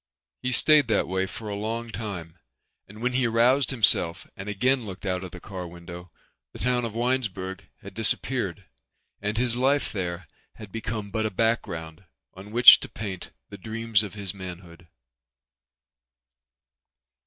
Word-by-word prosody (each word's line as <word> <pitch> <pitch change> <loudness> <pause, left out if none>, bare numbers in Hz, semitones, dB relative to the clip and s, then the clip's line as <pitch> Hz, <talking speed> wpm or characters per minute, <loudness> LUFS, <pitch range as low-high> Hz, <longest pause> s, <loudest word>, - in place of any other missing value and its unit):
He 125 - -1
stayed 150 +2 +6
that 110 -3 +1
way 95 +1 -1
for 110 +2 -8
a 105 - -3
long 115 +3 -4
time 90 -6 -6 0.5
and 105 +4 -11
when 125 0 0
he 125 -1 +2
aroused 120 +4 +3
himself 100 -9 +2
and 95 +2 -7
again 125 +5 +1
looked 100 -2 -8
out 90 -1 -1
of 95 - -6
the 90 - -10
car 90 -1 -7
window 85 +1 -10 0.4
the - - -9
town 125 -1 0
of 115 -2 -6
Winesburg 110 -6 -2
had 100 -1 -9
disappeared 110 -3 -1 0.6
and 105 +1 -2
his 120 0 +2
life 135 +3 +1
there 90 -4 -4 0.3
had 105 -3 -11
become 110 -2 -4
but 110 0 0
a - - -3
background 90 -6 -1 0.3
on 95 +2 -11
which 120 +2 +10
to - - -8
paint 95 -4 -6 0.2
the 100 - -10
dreams 115 +1 +1
of 105 -2 -7
his 100 -2 -6
manhood. 90 -2 -10
105 Hz, 155 wpm, -26 LUFS, 95-115 Hz, 0.6 s, which